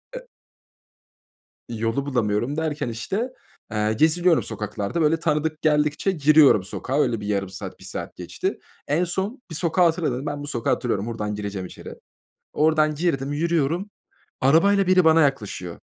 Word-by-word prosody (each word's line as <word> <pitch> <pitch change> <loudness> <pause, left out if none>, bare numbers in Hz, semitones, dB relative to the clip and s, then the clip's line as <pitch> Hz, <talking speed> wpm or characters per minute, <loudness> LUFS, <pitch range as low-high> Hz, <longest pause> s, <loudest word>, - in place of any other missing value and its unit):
E - - -6 1.4
İ 115 -2 -6
yolu 115 +5 -1
bulamıyorum 120 +1 -1
derken, 150 -5 -2
işte, 195 - -3 0.4
eee, 105 0 0
geziniyorum 165 +6 +3
sokaklarda, 105 - -3
böyle, 155 +1 +3
tanıdık 155 0 -1
geldikçe 150 +4 +2
giriyorum 150 - +5
sokağa 130 +8 -3
öyle 115 -5 0
bir 105 - -6
yarım 100 -2 -1
saat 95 - -8
1 - - -14
saat - - -6
geçti. - - -4 0.3
En 155 +5 +1
son 190 +8 -3
bir 165 - -6
sokağı 170 +2 +2
hatırladım. 165 -5 +1
Dedim: 130 +3 -5
"Ben 145 -1 -4
bu - - -6
sokağı 120 -5 0
hatırlıyorum, 110 -5 -1
buradan 105 -3 -3
gireceğim 100 -2 -5
içeri." - - -10 0.6
Oradan 155 0 +2
girdim, 145 -4 -1
yürüyorum. 170 +4 0 0.5
Arabayla 190 +8 +4
biri 185 -1 +4
bana 160 0 +6
yaklaşıyor. 105 - -2
150 Hz, 155 wpm, -23 LUFS, 115-165 Hz, 1.4 s, bana